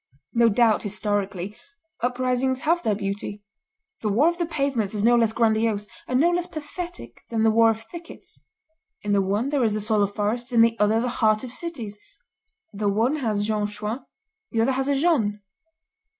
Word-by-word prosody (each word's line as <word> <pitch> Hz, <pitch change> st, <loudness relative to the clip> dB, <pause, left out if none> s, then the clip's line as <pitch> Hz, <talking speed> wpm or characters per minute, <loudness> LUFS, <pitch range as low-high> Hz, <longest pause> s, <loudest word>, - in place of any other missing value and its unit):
"No 235 Hz, -1 st, +5 dB
doubt, 225 Hz, 0 st, +3 dB
historically, 205 Hz, -1 st, -2 dB, 0.5 s
uprisings 255 Hz, +1 st, 0 dB
have 335 Hz, +3 st, +2 dB
their 215 Hz, -7 st, +1 dB
beauty; 200 Hz, 0 st, -4 dB, 0.6 s
the 215 Hz, -, -1 dB
war 240 Hz, +10 st, +4 dB
of 345 Hz, 0 st, -5 dB
the 345 Hz, -, 0 dB
pavements 275 Hz, -, -1 dB
is 205 Hz, -, -1 dB
no 240 Hz, +2 st, +5 dB
less 230 Hz, -2 st, +3 dB
grandiose, 220 Hz, -2 st, +1 dB, 0.2 s
and 250 Hz, 0 st, +1 dB
no 340 Hz, +4 st, +4 dB
less 350 Hz, 0 st, -1 dB
pathetic, 345 Hz, +3 st, -7 dB
than 225 Hz, -1 st, 0 dB
the 220 Hz, -, +5 dB
war 225 Hz, +1 st, +5 dB
of 225 Hz, 0 st, -2 dB
thickets: 340 Hz, +8 st, -12 dB, 0.6 s
in 205 Hz, 0 st, 0 dB
the 200 Hz, -, +4 dB
one 205 Hz, +7 st, 0 dB
there 285 Hz, -3 st, +1 dB
is 220 Hz, -2 st, +2 dB
the 215 Hz, -, -1 dB
soul 215 Hz, 0 st, +1 dB
of 200 Hz, 0 st, 0 dB
forests, 230 Hz, +4 st, -1 dB
in 235 Hz, -2 st, +5 dB
the 230 Hz, 0 st, +4 dB
other 210 Hz, +2 st, +3 dB
the 245 Hz, -, 0 dB
heart 215 Hz, 0 st, +3 dB
of 250 Hz, -2 st, -7 dB
cities; 240 Hz, -11 st, -5 dB, 0.7 s
the 205 Hz, 0 st, 0 dB
one 230 Hz, +9 st, +1 dB
has 215 Hz, -7 st, -1 dB
Jean 210 Hz, -1 st, 0 dB
Chouan, 210 Hz, +4 st, -5 dB, 0.5 s
the 225 Hz, -, 0 dB
other 245 Hz, +4 st, +3 dB
has 265 Hz, +1 st, -1 dB
a 285 Hz, -, +2 dB
Jeanne. 270 Hz, -10 st, +2 dB
225 Hz, 190 wpm, -24 LUFS, 210-260 Hz, 0.7 s, No